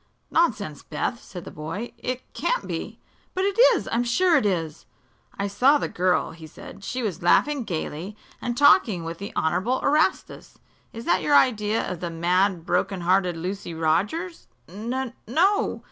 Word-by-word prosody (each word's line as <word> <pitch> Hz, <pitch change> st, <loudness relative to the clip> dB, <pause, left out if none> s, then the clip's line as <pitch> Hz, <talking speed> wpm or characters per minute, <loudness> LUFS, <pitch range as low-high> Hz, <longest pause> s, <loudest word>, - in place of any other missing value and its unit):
"Nonsense, 210 Hz, -, +1 dB
Beth," 165 Hz, +9 st, -3 dB
said 180 Hz, -3 st, -10 dB
the -, -, -8 dB
boy. 165 Hz, +10 st, -6 dB
"It 255 Hz, 0 st, -4 dB
can't -, -, -1 dB
be." -, -, -5 dB, 0.4 s
"But 375 Hz, -, 0 dB
it 400 Hz, +3 st, -1 dB, 0.2 s
is. -, -, -4 dB
I'm 235 Hz, +1 st, +1 dB
sure 335 Hz, +9 st, +3 dB
it 210 Hz, -, +3 dB
is!" 165 Hz, -5 st, -3 dB, 0.5 s
"I 200 Hz, -, -1 dB
saw 255 Hz, +9 st, +4 dB
the -, -, -2 dB
girl," 180 Hz, -2 st, 0 dB
he 160 Hz, -1 st, -11 dB
said. 195 Hz, +5 st, -12 dB
"She 255 Hz, +4 st, -3 dB
was 205 Hz, -6 st, -3 dB
laughing 270 Hz, +9 st, +3 dB
gaily 175 Hz, +2 st, -5 dB, 0.2 s
and 240 Hz, -1 st, -3 dB
talking 220 Hz, -10 st, +5 dB
with 165 Hz, +1 st, -6 dB
the 200 Hz, -, -6 dB
Honorable 185 Hz, +11 st, 0 dB
Erastus. 305 Hz, +6 st, 0 dB, 0.3 s
Is 230 Hz, +1 st, -8 dB
that 175 Hz, +2 st, +2 dB
your 290 Hz, -, +3 dB
idea 220 Hz, -5 st, +3 dB
of 180 Hz, -, -5 dB
the 175 Hz, -, -3 dB
mad, 175 Hz, +1 st, +1 dB
broken 195 Hz, -1 st, 0 dB
hearted 180 Hz, 0 st, +2 dB
Lucy 180 Hz, 0 st, -5 dB
Rogers?" 205 Hz, -, -1 dB, 0.2 s
"N 235 Hz, +7 st, -4 dB
no. 380 Hz, -, +2 dB
200 Hz, 165 wpm, -24 LUFS, 175-255 Hz, 0.5 s, talking